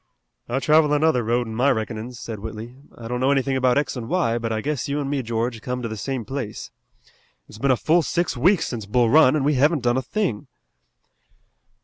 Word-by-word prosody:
"I 120 - -1
travel 150 +3 +3
another 150 -3 +3
road 120 +2 0
in 110 - -7
my 125 +5 +2
reckonin's," 115 0 -3
said 110 -3 -6
Whitley, 110 +3 -8 0.2
"I 115 - -8
don't 125 +1 -3
know 130 +1 +2
anything 135 -1 +1
about 130 -1 +2
x 145 -2 -1
and 120 -2 -6
y, 140 -11 +1
but 115 -1 -3
I 110 - -1
guess 145 +3 -3
you 145 +1 -1
an' 140 -1 -3
me, 140 -2 0
George, 115 0 -3
come 125 +1 -4
to - - -2
the 110 - -5
same 120 +3 -4
place. 125 -4 -6 0.8
It's 105 - -13
been 140 - 0
a 130 - +4
full 165 +7 +3
six 170 +1 -1
weeks 175 +9 +2
since 110 -5 -5
Bull 120 +1 +2
Run, 155 -2 +6
an' 150 - 0
we 150 +2 +2
haven't 145 +1 +2
done 120 +1 +2
a - - +1
thing." 165 - -2
125 Hz, 225 wpm, -23 LUFS, 115-145 Hz, 0.8 s, Run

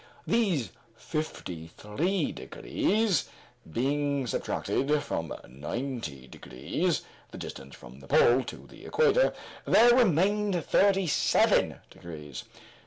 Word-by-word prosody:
These 195 - +1 0.2
fifty 90 - -5
three 160 - -1
degrees 210 -5 -1 0.4
being 140 - 0
subtracted 145 +4 -1
from 80 -1 -4 0.2
ninety 75 - -5
degrees 65 0 -2 0.3
the - - -10
distance 65 0 -8
from - - -13
the 70 - -14
pole 125 +2 +5
to - - -9
the - - -15
equator 475 +1 +3 0.3
there 240 +1 +6
remained 200 - +2
thirty 195 -1 +3
seven 160 - +2
degrees. 75 -4 -9
145 Hz, 105 wpm, -28 LUFS, -, 0.4 s, there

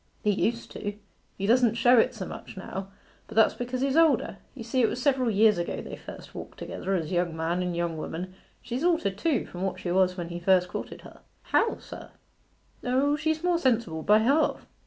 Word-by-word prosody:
'He 210 - +3
used 230 +3 -1
to 205 0 -5 0.4
he 195 - -2
doesn't 235 +1 +4
show 240 +1 +5
it 255 +2 +2
so 195 -4 -5
much - - -9
now; 190 0 -6 0.4
but 220 - -11
that's 220 -1 +5
because 250 +1 -4
he's 275 0 +1
older. 300 -11 +3 0.2
You 245 - -7
see, 245 +3 0
it 230 - +4
was 245 - -4
several 260 -2 +2
years 210 -2 +4
ago 170 - -3
they - - -7
first - - -11
walked - - -9
together 195 - -3
as 160 -4 -2
young 175 -2 0
man 165 +3 -1
and 180 -1 -2
young 170 -2 -1
woman. 180 +4 -5 0.3
She's 250 +5 -3
altered 325 - +2
too 300 -4 +1
from 180 - -9
what 185 -1 -2
she 175 - -3
was 185 0 +2
when 170 -1 -4
he 170 0 -5
first 180 0 +3
courted - - -6
her.' - - -14 0.2
'How, 455 -1 +1
sir?' - - -10 0.7
'O, 270 +4 +2
she's 315 +1 -1
more 355 -1 +2
sensible 230 - +1
by 210 +6 +5
half. 275 +8 +2
220 Hz, 210 wpm, -27 LUFS, 180-255 Hz, 0.7 s, show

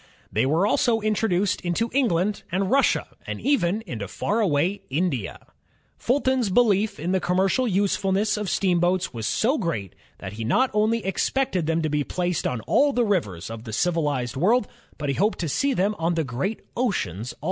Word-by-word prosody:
They 115 +5 +1
were 160 +7 +2
also 225 +2 +2
introduced 205 -3 0
into 185 +7 -1
England 210 -7 +1
and 190 +3 0
Russia, 275 +1 +2 0.2
and - - -4
even 220 -7 +1
into 110 - -5
far 210 - -1
away 180 0 +1
India. 140 - -1 0.6
Fulton's 260 -3 +1
belief 210 -1 +2
in 170 +4 -2
the 190 - +2
commercial 190 +8 +1
usefulness 200 +1 +1
of 210 -2 -3
steam 180 -2 +2
boats 175 -3 +1
was 115 -2 -3
so 260 +7 +1
great 110 - -3 0.2
that 95 0 -7
he 110 +1 -5
not 250 - +2
only 215 +1 +1
expected 195 - 0
them 165 0 +1
to 155 - 0
be 150 0 0
placed 180 +2 -1
on 125 -3 -3
all 285 - +2
the 245 -1 +2
rivers 105 - -1
of 115 -1 -7
the 115 - -7
civilized 145 -4 0
world, 205 - +2 0.3
but 145 -2 -3
he - - +1
hoped 205 +9 +1
to 170 - -2
see 275 - +1
them 200 +2 +1
on 165 +1 0
the 165 - +1
great 140 - -3
oceans 120 - -2
also. - - -27
185 Hz, 185 wpm, -24 LUFS, 150-215 Hz, 0.6 s, were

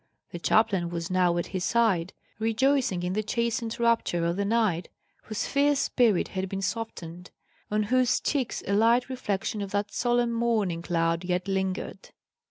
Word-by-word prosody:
The 175 - -6
chaplain 195 -3 +2
was 170 +1 -4
now 180 -2 +2
at 175 - -1
his 185 -1 -2
side, 195 -6 +2 0.3
rejoicing 225 -3 +1
in 180 +1 -1
the 215 - 0
chastened 235 +1 -2
rapture 230 -7 +1
of 170 +1 0
the 200 +1 -1
knight, 205 -6 +1 0.4
whose 215 -1 -3
fierce 285 +1 +2
spirit 230 -10 +2
had 190 0 -3
been 195 0 -4
softened, 180 -6 -5 0.4
on 210 0 +1
whose 250 +3 +2
cheeks 270 -5 -2
a 200 - -1
light 235 +4 +3
reflection 215 -4 -2
of 200 - -4
that 205 +1 -2
solemn 240 -1 +1
morning 220 -7 0
cloud 170 0 0
yet 180 +1 -1
lingered. 190 0 -3
205 Hz, 165 wpm, -27 LUFS, 180-235 Hz, 0.4 s, light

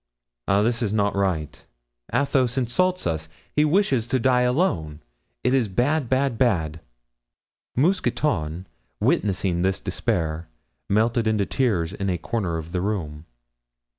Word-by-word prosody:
"Ah, 100 +1 +3
this 115 +1 0
is 110 -4 0
not 100 -2 +1
right; 85 -7 -1 0.5
Athos 130 -1 +1
insults 180 +9 +1
us; 80 -1 -2 0.3
he 150 - +4
wishes 150 - +2
to 130 - +1
die 125 0 +3
alone; 125 - 0 0.4
it 125 - +2
is 130 -5 +3
bad, 125 +7 0
bad, 130 -3 +1
bad." 80 -11 +1 1.0
Mousqueton, 125 - 0 0.3
witnessing 95 -3 +1
this 95 +1 +1
despair, 80 -1 -2 0.4
melted 115 +2 +2
into 105 -2 +2
tears 100 -12 0
in 100 -1 -2
a 90 - 0
corner 90 -2 -2
of 80 +1 -7
the 90 -1 -1
room. 85 -7 -3
105 Hz, 135 wpm, -24 LUFS, 85-130 Hz, 1.0 s, he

